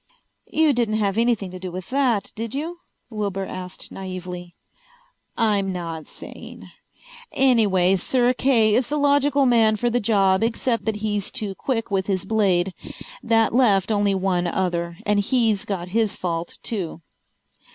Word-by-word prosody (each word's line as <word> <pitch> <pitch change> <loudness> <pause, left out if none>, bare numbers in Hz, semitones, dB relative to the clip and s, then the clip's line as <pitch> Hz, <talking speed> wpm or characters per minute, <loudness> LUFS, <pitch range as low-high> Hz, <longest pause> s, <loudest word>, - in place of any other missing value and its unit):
"You 315 -2 +3
didn't 235 -3 0
have 200 -3 0
anything 230 -5 +1
to 185 - -8
do 185 -1 -6
with 185 +4 -8
that, 255 -7 +1
did 225 +2 -5
you?" 330 +5 -4 0.3
Wilbur 200 -3 -3
asked 185 -1 -8
naively. 180 -2 -7 0.8
"I'm 205 -4 +1
not 165 -3 -5
saying. - - -11 0.6
Anyway, 205 -8 +3
Sir 245 +6 +2
Kay 235 -5 +3
is 245 +2 +2
the 300 - -2
logical 285 -1 +3
man 225 -3 +4
for 240 +3 0
the 245 - +1
job, 200 -3 +2
except 230 +1 0
that 220 -1 0
he's 205 -2 -1
too 215 -6 -5
quick 225 +1 -3
with 190 -1 0
his 190 -3 -1
blade. 195 -4 +1 0.5
That 225 -1 +2
left 215 -5 +3
only 205 -2 +2
one 185 -2 0
other, 170 -1 -2
and 210 0 +2
he's 220 -2 +1
got 185 -3 -4
his 220 +1 0
fault 170 -1 -4
too." 175 -7 -3
205 Hz, 150 wpm, -23 LUFS, 185-235 Hz, 0.8 s, man